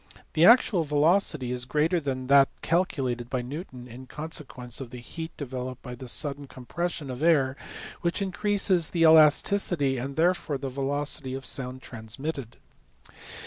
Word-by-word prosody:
The 160 - +4
actual 225 -6 +5
velocity 150 -2 +2
is 125 0 -3
greater 155 +6 +1
than 130 -4 -4
that 140 +1 +5
calculated 135 -9 -1
by 125 -2 -2
Newton 130 -2 -8
in 125 +2 -11
consequence 135 -5 -5
of 130 - -7
the 125 - -9
heat 160 +7 -7
developed 130 -2 -6
by 125 - -7
the 125 +1 -9
sudden 140 +2 0
compression 145 +3 -5
of 125 - -7
the 160 - +1
air 135 -5 +3 0.5
which 170 -1 -1
increases 195 -3 +1
the 170 - -2
elasticity 155 -2 +4
and 135 +3 -5
therefore 170 -3 +1
the 135 0 -5
velocity 140 0 -3
of 135 - -7
the - - -1
sound 130 -1 -4
transmitted. 120 +3 -7
140 Hz, 155 wpm, -26 LUFS, 130-165 Hz, 0.5 s, actual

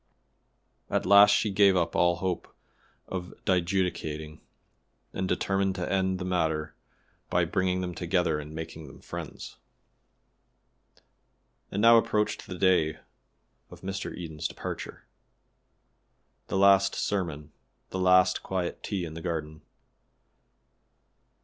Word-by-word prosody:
At - - 0
last 100 +2 +8
she 105 +1 +2
gave 100 -1 +5
up 85 - 0
all 85 0 +3
hope 90 0 -3 0.6
of 90 -1 -6
dijudicating, 85 -4 -1 0.7
and 95 0 -2
determined 95 0 0
to 90 -2 -3
end 95 -1 +1
the 90 - -5
matter 80 -4 -1 0.6
by 90 -1 +2
bringing 90 +2 0
them 90 -1 -4
together 85 -2 0
and 75 0 -8
making 80 -1 -7
them 70 - -13
friends. - - -8 2.1
And 100 +2 -2
now 115 0 +8
approached 105 -2 -1
the 95 -3 -6
day 85 -5 +2 0.7
of - - -13
Mr. 95 +1 -4
Eden's 80 -3 -4
departure. - - -7 1.4
The - - -2
last 100 0 +5
sermon 80 -7 -2 0.4
the 95 - -3
last 90 0 +4
quiet 90 -2 -3
tea 95 -4 -3
in 80 - -8
the 80 - -7
garden. 80 -2 -4
90 Hz, 120 wpm, -28 LUFS, 80-95 Hz, 2.1 s, last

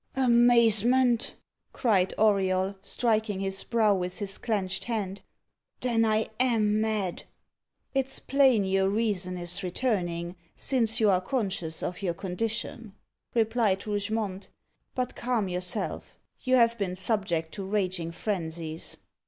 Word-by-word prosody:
"Amazement!" 240 -1 +4 0.4
cried 195 -7 +2
Auriol, 195 -2 +2
striking 215 0 0
his 195 0 -2
brow 220 -3 +3
with 180 -1 -3
his 200 -2 -5
clenched 200 -5 -2
hand. 205 -4 -3 0.6
"Then 230 -2 +2
I 220 0 +2
am 215 -4 +3
mad." 215 -5 -1 0.7
"It's 270 -1 0
plain 265 -7 +3
your 190 0 +2
reason 195 -4 -1
is 175 +2 -3
returning, 180 -4 -2 0.2
since 235 -4 +1
you 215 -3 +4
are 185 -1 +2
conscious 190 -7 -2
of 180 +2 -4
your 175 -4 -1
condition," 215 +3 -4 0.4
replied 225 -4 +1
Rougemont; 205 -1 -2 0.5
"but 250 -1 -2
calm 235 -5 -1
yourself, 180 +2 -3 0.2
you 255 -1 +2
have 235 -2 +4
been 185 -3 -2
subject 185 -5 -1
to 200 - -6
raging 185 -4 -1
frenzies." 165 -4 -4
205 Hz, 120 wpm, -28 LUFS, 185-230 Hz, 0.7 s, Amazement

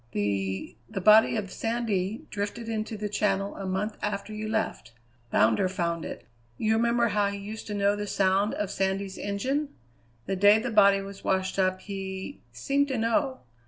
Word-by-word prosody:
The 100 -2 -2
the - - -3
body 215 +4 +6
of 200 -4 -3
Sandy 225 -3 -2
drifted 205 +3 -4
into 220 -1 -3
the 210 0 -3
Channel 200 -1 0
a 195 - -5
month 195 +3 -2
after 210 +1 -3
you 215 0 -4
left. 220 - -2 0.4
Bounder 110 - +3
found 170 -3 -2
it. - - -7 0.3
You 220 0 +2
remember 235 +1 +2
how 205 -1 +2
he 200 0 -3
used 210 +2 -7
to 210 - -3
know 200 0 +2
the 205 0 -4
sound 195 +2 +2
of 205 -2 -2
Sandy's 195 0 -1
engine? 265 +9 -2 0.5
The 195 - -1
day 205 +3 +6
the 235 +2 -2
body 200 -2 +5
was 195 0 -9
washed 190 0 0
up 185 0 +1
he 190 -1 -6
seemed 275 - 0
to 265 -3 -2
know. 260 +4 0
205 Hz, 175 wpm, -27 LUFS, 190-220 Hz, 0.5 s, body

